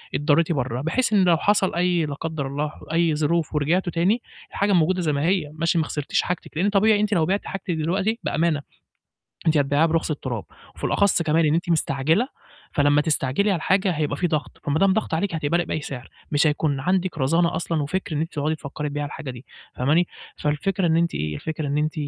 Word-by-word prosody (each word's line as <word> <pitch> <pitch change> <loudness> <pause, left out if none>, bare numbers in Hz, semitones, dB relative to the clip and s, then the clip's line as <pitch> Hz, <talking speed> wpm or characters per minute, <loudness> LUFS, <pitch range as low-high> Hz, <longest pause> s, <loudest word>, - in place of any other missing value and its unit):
اتضريتِ 155 +3 +2
برّه، 130 -4 -1
بحيث 210 - 0
إن 200 -2 +5
لو 175 -3 +4
حصل 200 0 +2
أي 175 -1 +2
لا 145 - -4
قدر 155 -1 -4
الله 145 +2 -2 0.2
أي 165 -2 +2
ظروف 155 +1 0
ورجعتوا 175 +5 +1
تاني 195 +8 +2 0.3
الحاجة 200 0 +1
موجودة 180 +1 +3
زي 155 -3 0
ما 140 - -1
هي، 175 -5 +1
ماشي 165 +1 0
ما 160 - +3
خسرتيش 150 -2 -1
حاجتِك، 180 -3 -5
لإن 190 +5 +2
طبيعي 205 +1 +4
أنتِ 210 0 +1
لو 165 -5 +3
بعتِ 195 +4 -1
حاجتِك 195 -1 -4
دلوقتي 190 +8 0
بأمانة، 160 -2 +1 0.9
أنتِ 160 -1 +4
هتبيعيها 145 +2 +3
برخص 165 0 0
التراب، 125 -7 -4 0.3
وفي - - -14
الأخص 200 -3 +2
كمان 160 +1 +2
إن 150 - +2
أنتِ 170 +1 -1
مستعجلة، 160 - +1 0.5
فلمّا 145 0 +4
تستعجلي 150 +5 +1
على 190 - +1
الحاجة 190 +3 +2
هيبقى 150 -3 -1
في 175 - +1
ضغط 155 -3 -3
فما 145 +2 0
دام 195 0 +4
ضغط 220 - -1
عليكِ 175 +2 0
هتقبلي 160 +2 0
بأي 155 - -3
سعر، 130 -3 -7 0.2
مش 150 +2 +3
هيكون 150 -2 0
عندِك 185 +4 0
رزانة 165 +5 +2
أصلًا 165 -3 -1
وفكر 185 +2 -3
إن 150 - 0
أنتِ 165 - -4
تقعدي 155 +1 -1
تفكّري 150 0 -5
تبيعي 145 0 -3
الحاجة 145 -2 -6
دي 125 +1 -12 0.3
فاهماني، 155 +7 +2 0.3
فالفكرة 170 +5 0
إن 160 - +3
أنتِ 170 0 +1
إيه 75 0 -2
الفكرة 155 - -4
إن 140 +1 -1
أنتِ 150 +1 0
160 Hz, 205 wpm, -23 LUFS, 145-180 Hz, 0.9 s, إن